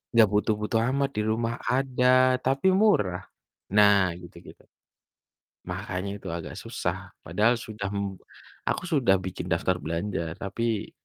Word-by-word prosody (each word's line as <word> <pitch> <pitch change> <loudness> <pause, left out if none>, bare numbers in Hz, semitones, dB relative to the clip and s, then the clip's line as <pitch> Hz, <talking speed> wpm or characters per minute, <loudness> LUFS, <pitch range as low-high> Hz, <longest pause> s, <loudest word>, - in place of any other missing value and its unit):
gak 115 -2 +7
butuh-butuh 105 +1 +1
amat 140 0 +1
di - - +2
rumah 115 +1 -1 0.2
ada, 130 -1 +3
tapi 135 +7 +2
murah. 95 - +2 0.5
Nah 100 -3 +5
gitu-gitu 85 0 -14 1.1
makanya 95 +1 -4
itu - - -9
agak 80 -5 -7
susah - - -3 0.3
padahal 105 +9 +2
sudah 105 -2 -5
mem 100 -2 -3 0.5
aku - - -1
sudah 125 -10 +4
bikin 90 -1 -5
daftar 90 +2 +1
belanja, 85 0 -3
tapi 110 +2 -2
105 Hz, 125 wpm, -26 LUFS, 95-120 Hz, 1.1 s, gak